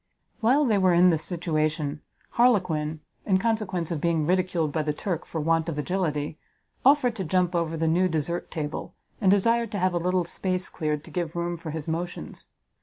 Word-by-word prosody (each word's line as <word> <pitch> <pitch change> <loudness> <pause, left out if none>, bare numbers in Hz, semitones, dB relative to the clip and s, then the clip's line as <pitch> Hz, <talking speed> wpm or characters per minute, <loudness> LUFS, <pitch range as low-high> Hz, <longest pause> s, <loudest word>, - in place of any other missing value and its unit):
While 260 +6 +3
they 215 -5 +3
were 185 -2 +4
in 180 +1 +6
this 160 -1 0
situation, 155 -4 -1 0.3
Harlequin, 165 -10 +2 0.2
in 190 -2 +3
consequence 190 -5 -1
of 160 -4 -2
being 165 -3 +1
ridiculed 180 -3 +1
by 155 - 0
the 150 0 -1
Turk 175 0 -3
for 160 - -4
want 165 +1 +1
of 155 - -4
agility, 150 -2 -2 0.4
offered 260 -3 +4
to 190 - -2
jump 180 +1 +1
over 165 -1 -1
the 165 - 0
new 175 +3 +3
desert 165 +2 -2
table, 150 -1 -5 0.3
and 195 - +4
desired 230 +3 +3
to - - -1
have 185 -1 +1
a 175 - +1
little 180 +1 +1
space 185 +2 -2
cleared 150 -3 -2
to - - -13
give 170 -3 -3
room 175 0 -1
for 165 -1 -7
his 155 0 -5
motions. 170 +2 -5
170 Hz, 190 wpm, -26 LUFS, 160-185 Hz, 0.4 s, in